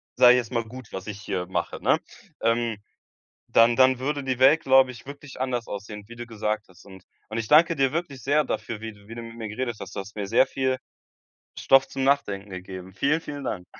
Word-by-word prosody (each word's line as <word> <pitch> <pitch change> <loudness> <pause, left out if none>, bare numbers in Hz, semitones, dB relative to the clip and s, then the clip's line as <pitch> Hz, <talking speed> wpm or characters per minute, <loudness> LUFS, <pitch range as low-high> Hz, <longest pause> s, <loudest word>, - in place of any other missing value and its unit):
sage 125 0 +8
ich 125 - +4
jetzt 120 -3 -6
mal, 115 -2 0
gut, 125 +1 -10
was 95 +1 -7
ich 105 -1 -6
hier 95 -3 -3
mache, 95 - -3
ne? - - +3 0.4
Ähm, 115 -1 +1 0.7
dann 115 +1 +5
dann 130 0 +5
würde 145 +2 -2
die 130 -2 -1
Welt, 140 +5 +6
glaube 130 -1 +5
ich, 120 -2 -13
wirklich 140 -1 -10
anders 125 -3 -2
aussehen, 105 +1 -7
wie 120 - -11
du 120 - -6
gesagt 110 -2 -3
hast. 90 -1 -19
Und 95 -2 -13 0.3
und 110 - -4
ich 115 - -2
danke 165 +3 +6
dir 135 -1 +2
wirklich 155 -6 -4
sehr 150 +2 +3
dafür, 110 -6 -4
wie 115 0 -5
d 100 -1 -20
wie 115 - -9
du 120 - -6
mit 115 0 -10
mir 110 - -5
geredet 120 +2 -4
hast, 95 +1 -9
du 100 - -3
hast 100 +2 -12
mir 105 -2 -4
sehr 115 +5 +4
viel 130 -1 -1 0.8
Stoff 135 0 +5
zum 135 - -4
Nachdenken 105 -8 0
gegeben. 95 0 -8
Vielen, 140 - +1
vielen 145 -3 -7
Dank. 90 -3 -4
120 Hz, 230 wpm, -25 LUFS, 105-135 Hz, 0.8 s, sage